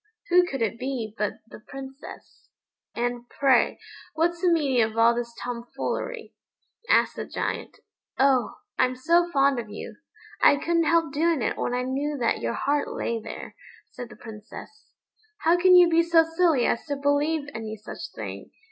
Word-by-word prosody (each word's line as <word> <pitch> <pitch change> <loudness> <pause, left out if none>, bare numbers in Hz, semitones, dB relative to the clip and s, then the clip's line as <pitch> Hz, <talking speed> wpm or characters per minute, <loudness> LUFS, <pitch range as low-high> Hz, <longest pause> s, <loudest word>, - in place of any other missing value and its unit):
Who 360 0 +5
could 270 -8 -2
it 225 +1 -2
be 250 -5 -4
but 210 -2 -1
the - - -12
Princess? 270 +3 -11 0.5
"And, 240 0 -3
pray, 270 -3 +2 0.4
what's 335 +2 0
the 360 -2 +3
meaning 280 -7 +2
of 220 0 -1
all 230 +1 +5
this 235 0 -4
tomfoolery?" 245 - -5 0.6
asked - - +3
the - - -4
Giant. - - -4 0.4
"Oh, 265 -4 +2 0.2
I'm 255 0 +2
so 340 +6 +2
fond 275 -4 +2
of 225 -3 -7
you, 210 - -8 0.4
I - - +7
couldn't 335 +3 +1
help 330 -2 +2
doing 315 -3 +1
it - - 0
when 245 - -2
I 250 - -1
knew 280 +3 -2
that 235 -3 0
your 115 0 -1
heart 290 0 0
lay 230 -1 -3
there," - - -9 0.4
said 245 -2 -8
the - - -12
Princess. 225 - -11 0.5
"How 330 +2 +4
can 365 +1 +5
you 355 -1 +8
be 335 0 +4
so 335 -1 +4
silly 325 -5 +2
as - - 0
to 285 - -1
believe 285 +2 0
any 220 -1 -5
such 215 +1 -8
thing?" - - -7
275 Hz, 170 wpm, -25 LUFS, 235-330 Hz, 0.6 s, you